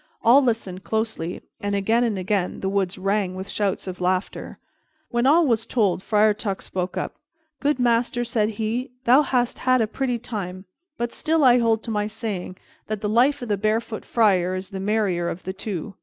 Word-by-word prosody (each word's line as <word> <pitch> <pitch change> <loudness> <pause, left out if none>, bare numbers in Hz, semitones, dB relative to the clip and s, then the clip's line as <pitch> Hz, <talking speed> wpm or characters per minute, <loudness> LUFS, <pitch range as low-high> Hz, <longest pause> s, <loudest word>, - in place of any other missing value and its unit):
All 250 +5 +7
listened 220 -7 -2
closely, 220 -3 -3 0.2
and 205 0 -2
again 220 +4 +2
and 225 -4 0
again 190 0 -1
the 190 - -1
woods 195 -1 -1
rang 195 -1 0
with 190 +1 -6
shouts 200 -1 -1
of 185 -1 -6
laughter. 185 +1 -2 0.5
When 240 +2 +2
all 325 +4 +5
was 230 -4 +1
told, 205 -7 +1
Friar 210 +1 +3
Tuck 205 -2 -4
spoke 180 0 -4
up. - - -4 0.4
"Good 290 0 +1
master," 240 0 +1
said 220 -3 +1
he, 230 +4 -2
"thou 255 +4 +6
hast 250 -4 0
had 255 0 +3
a 225 - +3
pretty 245 +3 -2
time, 200 -6 -6 0.3
but 235 0 -2
still 320 -1 +1
I 250 -1 +6
hold 225 -2 +2
to 230 - -5
my 210 -1 0
saying, 205 -4 -5 0.3
that 215 -1 -3
the 210 - -1
life 255 +5 +3
of 240 - -6
the 205 - +1
barefoot 220 +2 -1
friar 185 -5 +2
is 185 0 -5
the 195 -2 -6
merrier 195 -4 0
of 180 - -6
the 190 - -4
two." 195 -1 -5
215 Hz, 195 wpm, -23 LUFS, 190-240 Hz, 0.5 s, All